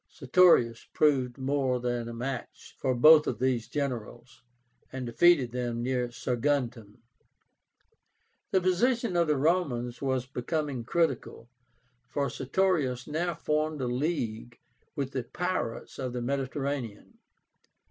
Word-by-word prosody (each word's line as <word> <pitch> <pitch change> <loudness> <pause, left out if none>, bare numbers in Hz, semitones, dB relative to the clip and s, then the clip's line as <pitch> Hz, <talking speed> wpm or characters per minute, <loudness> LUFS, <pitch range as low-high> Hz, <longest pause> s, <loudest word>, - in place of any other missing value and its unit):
Sertorius 130 -5 +3
proved 130 -5 +2
more 135 -1 0
than 120 -1 -2
a - - -6
match 125 +2 -6
for 130 -1 0
both 155 +5 +7
of 115 - -1
these 125 -2 0
generals, 120 -4 -5 0.5
and 130 -1 -5
defeated 130 +1 +4
them 120 -1 -3
near 125 -1 0
Saguntum. 120 -4 -2 1.5
The 190 - +2
position 230 +3 +1
of 170 -1 +3
the 150 -2 +2
Romans 135 -6 0
was 130 -2 0
becoming 135 0 -3
critical, 135 -6 -1 0.6
for 140 0 -2
Sertorius 135 -4 0
now 170 +3 -2
formed 155 -1 -1
a 130 - -1
league 120 -4 -2 0.4
with 140 -3 -3
the 130 -3 -3
pirates 180 -3 -4
of 130 -2 -3
the 125 - -3
Mediterranean. 135 -3 -4
130 Hz, 120 wpm, -28 LUFS, 120-155 Hz, 1.5 s, both